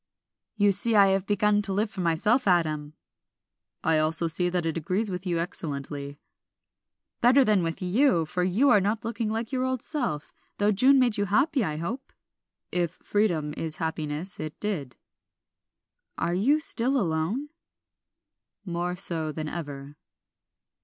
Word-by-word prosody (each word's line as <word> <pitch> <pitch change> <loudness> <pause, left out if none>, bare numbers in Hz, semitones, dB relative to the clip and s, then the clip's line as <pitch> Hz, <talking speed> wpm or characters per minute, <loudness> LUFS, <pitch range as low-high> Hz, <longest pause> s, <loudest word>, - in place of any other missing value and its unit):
"You 205 -2 +3
see 220 +4 +3
I 200 -1 +6
have 195 0 0
begun 205 0 +2
to 200 -1 -3
live 210 +2 -1
for 195 - -5
myself, 205 +9 +1
Adam." 155 -4 +1 0.9
"I 160 -1 +3
also 155 +2 +2
see 175 +2 +1
that 175 -1 -1
it 165 - -1
agrees 190 +6 -1
with 180 +1 -5
you 175 -2 0
excellently." 145 -4 -5 1.0
"Better 260 +3 +5
than 210 -3 +3
with 165 +2 -3
you, 180 - +2
for 180 +3 -2
you 205 +10 +3
are 205 - +5
not 210 +3 -1
looking 230 -1 -2
like 225 +2 -3
your 255 -1 -1
old 260 -2 -2
self, 240 - -3 0.2
though 205 +1 +2
June 260 +7 +5
made 245 -4 +2
you 205 - +1
happy, 260 +7 +2
I 155 -5 -3
hope?" 235 - -5 0.6
"If 175 -2 0
freedom 170 -8 0
is 160 -1 -2
happiness 160 +2 -3
it 155 -1 -6
did." 165 -12 -3 1.2
"Are 170 - -1
you 255 +12 +2
still 270 -3 +2
alone?" 185 - -1 1.2
"More 175 0 -3
so 165 -4 +2
than 155 +1 -5
ever." 145 -3 -7
185 Hz, 155 wpm, -26 LUFS, 160-220 Hz, 1.2 s, I